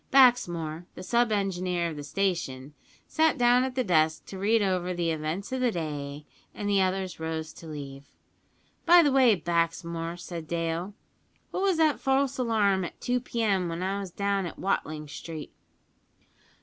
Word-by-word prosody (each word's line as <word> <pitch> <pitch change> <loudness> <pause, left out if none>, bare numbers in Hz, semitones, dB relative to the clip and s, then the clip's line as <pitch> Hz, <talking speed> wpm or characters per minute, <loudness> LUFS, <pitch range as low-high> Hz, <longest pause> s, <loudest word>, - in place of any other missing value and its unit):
Baxmore, 175 - +3
the 180 - -8
sub 235 +3 +2
engineer 185 -4 0
of - - -7
the 145 - -6
station, 145 -6 -2 0.3
sat 315 -2 +2
down 245 0 +5
at 260 -1 -3
the 255 - +1
desk 160 -5 +2
to 190 - -8
read 215 +2 +3
over 180 -2 0
the 170 -1 0
events 160 +7 -3
of 260 0 -2
the 250 - +3
day, 150 -4 -5 0.3
and 205 - -4
the 200 -1 +3
others 185 -1 -1
rose 160 0 -4
to 165 - -12
leave. 140 -2 -8 0.8
"By 345 0 +7
the 290 - +3
way, 260 -5 +5
Baxmore," 170 0 -2
said 170 -2 -7
Dale, 170 +4 -2 0.6
"what - - -2
was 385 -3 +2
that 315 -2 +3
false 270 0 +1
alarm 210 -6 +2
at 175 - -7
2 250 0 0
p.m. 210 -7 0
when 165 +2 -3
I 195 +2 -1
was 195 -2 -5
down 200 0 -1
at - - -9
Watling 155 -5 -2
Street?" 155 +1 -8
185 Hz, 170 wpm, -28 LUFS, 165-230 Hz, 0.8 s, By